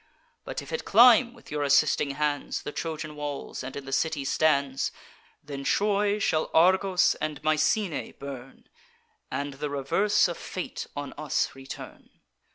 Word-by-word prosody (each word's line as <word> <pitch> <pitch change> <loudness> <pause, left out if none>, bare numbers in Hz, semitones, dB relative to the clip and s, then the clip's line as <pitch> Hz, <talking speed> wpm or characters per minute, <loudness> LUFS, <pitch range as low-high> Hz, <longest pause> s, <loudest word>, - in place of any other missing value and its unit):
But - - -5
if - - -11
it 480 - -2
climb, 235 +2 +6
with - - -16
your 150 0 -2
assisting 140 0 +3
hands, 150 -1 -1
The - - -5
Trojan 155 -1 -5
walls, 145 -2 -5
and 130 +1 -7
in 140 - -6
the 135 - -7
city 155 -2 0
stands; 140 -2 +1 0.5
Then 140 -1 -6
Troy 205 +4 +2
shall 160 -6 0
Argos 185 +2 +4
and 155 -2 -2
Mycenae 155 +4 +1
burn, 135 -2 -10 0.6
And 140 0 -3
the 145 +2 -4
reverse 190 +11 +2
of 175 - -5
fate 185 - -5
on 145 -1 -5
us 155 -3 0
return. 135 0 -10
150 Hz, 150 wpm, -27 LUFS, 140-185 Hz, 0.6 s, climb